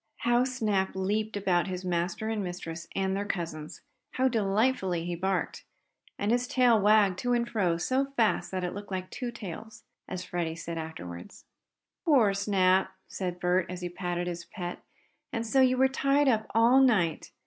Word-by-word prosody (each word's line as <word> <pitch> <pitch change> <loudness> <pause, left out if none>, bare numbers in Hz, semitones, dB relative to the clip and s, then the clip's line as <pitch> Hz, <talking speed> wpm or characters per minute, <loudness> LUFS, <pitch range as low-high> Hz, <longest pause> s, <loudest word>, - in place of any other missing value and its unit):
How 240 +1 +3
Snap 215 -8 -1
leaped 210 +3 -1
about 185 -3 +1
his 185 0 -5
master 175 +4 -1
and 220 -2 -1
mistress 170 -2 -6
and 190 0 0
their 200 - -1
cousins! 165 -6 -5 0.3
How 260 +1 +2
delightedly 205 -5 +1
he 175 - -2
barked! 185 +2 -2 0.5
And 205 +2 0
his 245 +1 +1
tail 245 -5 +4
wagged 205 -2 +4
to 245 0 0
and 235 -1 +1
fro 185 -8 +1
so 260 +10 +1
fast 225 -3 +2
that 185 -1 -3
it 180 - -2
looked 205 0 -8
like 185 -1 -4
two 250 -2 -4
tails, 220 -1 -8 0.2
as 185 -1 -5
Freddie 170 -3 -3
said 165 0 -5
afterward. 90 - -7 0.7
"Poor 255 - +4
Snap!" 190 -1 +2 0.2
said 180 -2 -4
Bert, 180 0 +1
as 180 0 -6
he 175 - -3
patted 175 0 -3
his 175 -1 -4
pet 175 -3 -6 0.5
"And 230 -1 -2
so 265 +4 +3
you 255 0 +4
were 265 +1 +5
tied 275 +2 +2
up 220 -4 +2
all 235 +4 +6
night? 195 - +2
195 Hz, 175 wpm, -29 LUFS, 175-230 Hz, 0.7 s, all